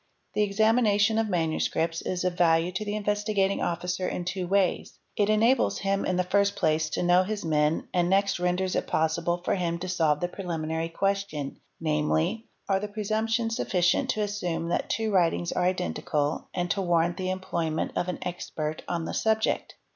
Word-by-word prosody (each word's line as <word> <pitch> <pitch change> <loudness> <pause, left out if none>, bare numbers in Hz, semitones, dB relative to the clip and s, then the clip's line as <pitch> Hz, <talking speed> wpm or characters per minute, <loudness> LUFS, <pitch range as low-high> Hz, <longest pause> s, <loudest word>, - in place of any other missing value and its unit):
The - - +1
examination 215 +1 +3
of 225 -1 0
manuscripts 165 -1 0
is 180 -1 -2
of 180 -1 +1
_ - - -14
value 165 0 +3
to 190 +4 -3
the 205 0 -3
Investigating 205 -1 0
Officer 180 +2 -1
in 175 - -4
two 180 0 -3
ways; 195 -1 0 0.2
it 205 0 +2
enables 230 +4 +3
him 195 0 0
in 185 - +1
the 180 - +2
first 200 +2 +2
place 155 -3 +1
to - - -2
know 175 +1 +5
his 205 0 -3
men 150 0 +1
and 175 -1 +2
next 195 0 +2
renders 180 +1 0
it - - -1
possible 170 +2 0
for - - +2
him 170 -3 -1
to 180 +2 -5
solve 160 -5 +2
_ - - -15
the 175 - +1
preliminary 165 -3 -3
question, 195 -6 -2 0.2
namely, 160 +7 0 0.2
''are 195 -1 +1
the 210 - -3
presumptions 225 +2 -1
sufficient 180 -6 +1
to 215 - 0
assume 175 -5 -2
that - - -1
two 220 0 0
writings 175 -2 +2
are 180 - 0
identical 150 - -1
and 175 -1 -2
to 195 - 0
warrant 175 -1 +1
the 185 -1 -2
employment 170 -4 -2
_ - - -25
of 175 - -5
an 180 - -2
expert 155 -3 -4
on 170 -2 -2
the - - -4
subject?" 220 0 0
180 Hz, 190 wpm, -27 LUFS, 165-200 Hz, 0.2 s, know